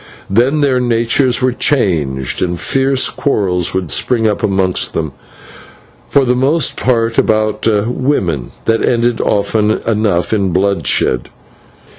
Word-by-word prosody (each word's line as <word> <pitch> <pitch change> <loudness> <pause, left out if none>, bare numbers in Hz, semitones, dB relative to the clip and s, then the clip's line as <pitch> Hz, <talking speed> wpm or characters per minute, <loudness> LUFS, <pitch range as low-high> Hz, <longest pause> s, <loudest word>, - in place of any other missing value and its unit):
Then 130 +9 +2
their 135 -3 +2
natures 120 +2 +1
were 130 - +3
changed, 80 - -1
and 90 -1 -1
fierce 135 - +1
quarrels 95 - -1
would 90 -4 -2
spring 115 -3 +1
up 105 - -1
amongst 95 -2 0
them, 80 -3 -2 1.0
for 140 -1 +3
the 125 - +2
most 140 +4 +1
part 115 -2 0
about 110 0 0 0.2
women, 105 - -1 0.2
that 115 0 +1
ended 120 -1 +1
often 105 +1 +1 0.2
enough 105 -5 0
in 100 -3 +1
bloodshed. 95 -9 0
110 Hz, 125 wpm, -14 LUFS, 95-125 Hz, 1.0 s, were